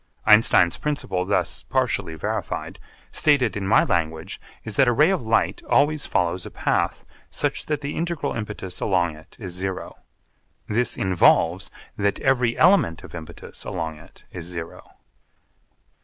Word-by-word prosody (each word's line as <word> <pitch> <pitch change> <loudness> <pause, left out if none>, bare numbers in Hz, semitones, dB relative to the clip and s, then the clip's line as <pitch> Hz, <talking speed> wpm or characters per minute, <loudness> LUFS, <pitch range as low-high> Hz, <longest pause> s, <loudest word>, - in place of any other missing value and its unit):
Einstein's 105 -5 +5
principle, 130 -11 -2
thus - - 0
partially 120 -10 -1
verified, 75 - -4 0.3
stated 140 -7 +2
in 100 -2 -3
my 110 - +5
language 80 -1 -2 0.2
is 110 - -6
that 135 - +4
a - - +5
ray 150 +9 +4
of 190 - 0
light 110 -1 +1
always 145 +1 +3
follows 90 0 0
a - - -7
path - - -1 0.2
such - - -2
that 150 -1 -1
the 140 +1 -4
integral 170 -2 -2
impetus 105 -4 -5
along 85 -5 +1
it 80 +1 -17
is 95 -5 -6
zero. 95 +1 -4 0.7
This 120 +3 0
involves 95 -2 +3 0.3
that 100 -1 0
every 125 -3 +2
element 165 - +4
of - - -12
impetus 80 -2 -9
along 80 -2 -4
it 80 - -18
is 85 -2 -7
zero. 85 -1 -8
105 Hz, 145 wpm, -23 LUFS, 85-135 Hz, 0.7 s, Einstein's